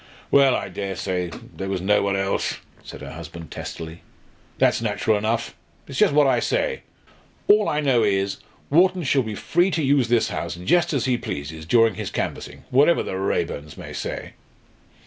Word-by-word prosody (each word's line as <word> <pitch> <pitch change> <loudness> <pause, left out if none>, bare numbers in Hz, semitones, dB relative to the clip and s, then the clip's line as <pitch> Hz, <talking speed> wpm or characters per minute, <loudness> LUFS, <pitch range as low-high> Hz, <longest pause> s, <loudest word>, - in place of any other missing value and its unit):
"Well, 135 -2 +6
I - - -2
dare 100 -1 -4
say 90 -1 -2 0.3
there 95 0 -4
was 95 -1 -1
no 105 +3 +3
one 100 0 0
else," 95 0 -1 0.3
said - - -10
her - - -7
husband, 85 0 -9
testily. 80 +1 -7 0.6
"That's - - +3
natural 110 - +1
enough. 110 +3 -1 0.3
It's - - -5
just - - +5
what 145 0 +5
I 135 - +3
say. 475 -1 -1 0.7
All 415 +1 +5
I 150 - 0
know 130 -5 +3
is, 100 -1 +1 0.3
Wharton 180 +3 +4
shall 135 -1 +2
be 110 -3 -4
free 175 - +1
to 165 -3 -1
use 135 -3 +3
this 120 -1 +2
house - - -4
just 165 - +2
as 140 -6 0
he 125 -2 +1
pleases 80 +2 -6
during 115 +1 +4
his 105 +1 -5
canvassing, - - -4
whatever 145 +6 +4
the - - -5
Raeburns 75 -6 -2
may - - -8
say." - - -5
110 Hz, 180 wpm, -23 LUFS, 95-140 Hz, 0.7 s, Well